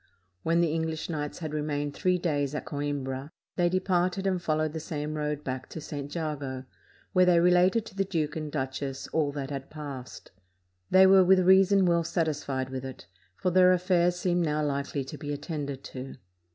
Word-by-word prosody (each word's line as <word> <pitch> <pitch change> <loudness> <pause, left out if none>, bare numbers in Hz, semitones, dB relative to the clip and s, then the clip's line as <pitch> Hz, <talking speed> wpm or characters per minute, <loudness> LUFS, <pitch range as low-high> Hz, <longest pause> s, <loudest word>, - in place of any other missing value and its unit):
When 165 - +2
the 165 -3 +1
English 160 0 -2
knights 150 -2 -4
had 155 -3 -5
remained 145 -1 -2
three 180 +3 +1
days 145 -5 -1
at - - -4
Coimbra, 140 -1 -3 0.3
they 175 -1 +2
departed 185 +1 0
and 185 -2 0
followed 155 -2 0
the 160 - -3
same 150 -2 -4
road 150 -1 -2
back 130 -1 -5
to - - -7
St. 145 -2 -6
Jago, 140 -5 -4 0.5
where 185 -1 +5
they 175 -1 +5
related 180 +5 +4
to 205 - -12
the 195 - +1
duke 160 -6 -2
and 155 -2 -4
duchess 135 -1 -4
all 150 -3 +1
that 140 -1 -5
had 135 -1 -5
passed. 140 -5 -8 0.6
They 190 0 +7
were 190 0 +7
with 185 +1 +5
reason 190 +1 +5
well 170 -1 +3
satisfied 145 -6 -2
with 130 -1 -4
it, 130 -8 -8 0.3
for 180 - -1
their 185 0 +6
affairs 180 -1 +2
seemed 175 -1 0
now 150 -1 0
likely 140 0 -2
to 135 - -9
be 145 -1 -5
attended 145 -2 -4
to. 130 +1 -7
155 Hz, 185 wpm, -28 LUFS, 145-180 Hz, 0.6 s, They